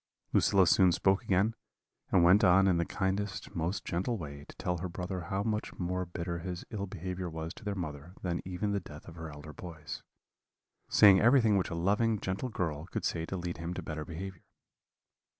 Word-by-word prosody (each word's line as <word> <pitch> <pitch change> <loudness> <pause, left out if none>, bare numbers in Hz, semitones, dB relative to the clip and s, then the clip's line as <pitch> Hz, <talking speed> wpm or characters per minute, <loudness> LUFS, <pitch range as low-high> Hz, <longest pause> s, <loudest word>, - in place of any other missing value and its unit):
"Lucilla 95 -2 +5
soon 90 +1 +5
spoke 95 +3 +3
again, 100 +4 +2 0.6
and 90 -3 +5
went 95 +5 +6
on 95 +1 +6
in 90 -3 +4
the 85 - +1
kindest, 100 +2 -2
most 85 +4 -2
gentle 95 +7 -1
way, 70 -5 -7
to - - -11
tell 90 -1 -2
her 90 +2 -3
brother 90 0 -4
how 95 0 -1
much 110 -1 -2
more 90 0 -2
bitter 85 0 -4
his 90 +1 -5
ill 100 -2 -3
behaviour 90 -1 -4
was 80 0 -5
to - - -14
their 105 -1 -2
mother 80 -1 -6
than 85 -2 -1
even 95 +3 -2
the 100 - +1
death 75 -5 -12
of 85 - -9
her 80 -1 -7
elder 75 +1 -10
boys; 80 -2 -8 0.9
saying 100 -2 +7
everything 115 -3 +5
which 95 - +1
a 85 - -3
loving, 105 +5 +2
gentle 95 +8 -2
girl 80 -7 -3
could - - -3
say 80 0 -1
to 95 - -3
lead 85 -1 -4
him 85 +2 -4
to - - -4
better 75 -1 -4
behaviour. 85 +3 -7
90 Hz, 200 wpm, -31 LUFS, 85-100 Hz, 0.9 s, saying